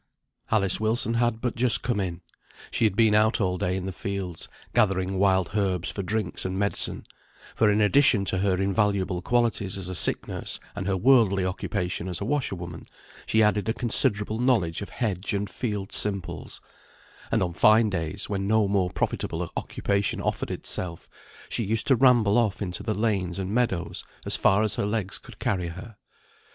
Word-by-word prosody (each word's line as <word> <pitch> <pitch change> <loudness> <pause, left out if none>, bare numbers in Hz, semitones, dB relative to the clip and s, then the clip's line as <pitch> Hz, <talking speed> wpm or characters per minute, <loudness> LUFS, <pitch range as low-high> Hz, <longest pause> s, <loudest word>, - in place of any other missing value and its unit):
Alice 100 -4 +2
Wilson 110 +1 0
had 115 -1 0
but 125 -2 -2
just 120 -1 +5
come 120 -4 -1
in. 90 -3 -3 0.5
She - - +1
had 105 -3 +1
been 110 -1 +4
out 110 +1 +3
all 90 -3 0
day 90 - -1
in 95 -1 -4
the 95 - -3
fields, 95 -2 -5 0.2
gathering 95 -2 +1
wild 95 -3 +2
herbs 95 -4 0
for 100 - -4
drinks 105 0 -2
and 95 0 -3
medicine, 100 +1 +1 0.5
for 110 - +3
in 105 +1 +2
addition 105 -2 +4
to 95 - 0
her 95 -1 +1
invaluable 95 -2 0
qualities 115 -4 0
as 95 -2 -6
a - - -4
sick - - +4
nurse - - -3 0.2
and 100 -1 -4
her 95 -1 0
worldly 105 -4 +4
occupation 90 -1 -3
as 90 -2 -1
a 100 - -4
washerwoman, 95 - -3 0.4
she 110 0 +3
added 105 -1 +1
a - - +1
considerable 110 -3 +2
knowledge 110 -11 +1
of 100 - -6
hedge 100 -2 -2
and 100 0 -3
field 105 -5 -4
simples; 95 -5 -2 0.7
and - - +2
on 85 -2 -3
fine 110 +5 +5
days, 85 +2 -3
when 100 -1 -2
no 110 -1 +3
more 95 -2 +1
profitable - - -3
occupation 100 0 -1
offered - - -2
itself, 85 -3 -4 0.4
she 115 - -2
used 110 +2 0
to 135 - +4
ramble 120 -4 +4
off 110 -4 0
into 90 -3 -4
the 110 -2 -2
lanes 100 -5 -1
and 95 +1 -4
meadows 95 -8 -1 0.2
as - - +1
far 100 +3 +3
as 110 -1 +1
her - - 0
legs 105 -3 -2
could - - -14
carry 90 -3 -1
her. 95 +6 -9
100 Hz, 180 wpm, -25 LUFS, 95-110 Hz, 0.7 s, just